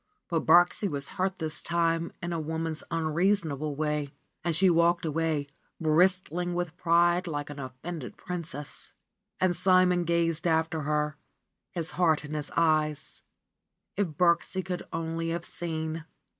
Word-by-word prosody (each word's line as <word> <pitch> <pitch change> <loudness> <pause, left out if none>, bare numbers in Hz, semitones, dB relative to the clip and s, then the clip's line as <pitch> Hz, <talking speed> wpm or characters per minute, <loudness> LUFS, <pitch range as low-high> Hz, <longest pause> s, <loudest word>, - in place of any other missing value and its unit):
But 165 -2 -1
Birksie 175 +4 +5
was 140 -3 -2
hurt 190 0 -1
this 160 -2 -4
time 170 -1 0
in 175 0 -2
a 165 - -1
woman's 160 0 -3
unreason 165 +2 +1
able 145 +1 -3
way, 150 -1 -1 0.3
and 170 -1 0
she 190 +4 +4
walked 170 0 +3
away, 160 -1 0 0.3
bristling 175 +1 +2
with 175 -1 -2
pride 175 +1 +3
like 145 -2 -3
an 145 - -8
offended 130 -1 -7
princess. 165 -5 -7 0.5
And 185 -1 +2
Simon 185 -1 +4
gazed 170 0 +1
after 160 -1 +1
her, 150 0 -1 0.5
his 170 -1 -3
heart 160 -4 +3
in 150 - -7
his 150 -1 -2
eyes; 155 -2 +1 0.7
if 205 -1 +1
Birksie 170 +3 +1
could 180 -1 -3
only 165 0 -2
have 170 +1 -3
seen. 160 -1 -4
165 Hz, 145 wpm, -28 LUFS, 155-175 Hz, 0.7 s, Birksie